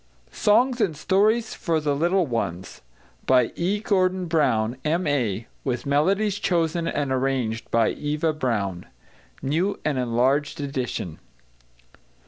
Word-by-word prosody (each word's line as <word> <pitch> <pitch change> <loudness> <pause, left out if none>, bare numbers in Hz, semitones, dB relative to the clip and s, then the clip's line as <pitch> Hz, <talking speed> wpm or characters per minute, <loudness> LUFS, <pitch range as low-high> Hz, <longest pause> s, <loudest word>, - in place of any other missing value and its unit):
=Songs 245 +4 +2
and 160 -8 0
Stories 215 +7 +2
for 165 -3 -1
the 145 -2 0
Little 175 +5 +2
Ones= 95 - -4 0.5
By 125 -2 +4
E. 190 +5 0
GORDON 185 -3 +1
BROWNE, 125 -8 +1
M.A. 145 - 0 0.2
With 125 -3 -2
Melodies 190 +9 +1
chosen 170 -1 0
and 145 -2 -1
arranged 130 -4 -1
by 115 -1 +3
EVA 150 +2 -1
BROWNE. 105 - -2 0.6
New 165 +9 0
and 145 -4 0
Enlarged 130 +5 +1
Edition. 130 - -4
145 Hz, 115 wpm, -24 LUFS, 125-180 Hz, 0.6 s, By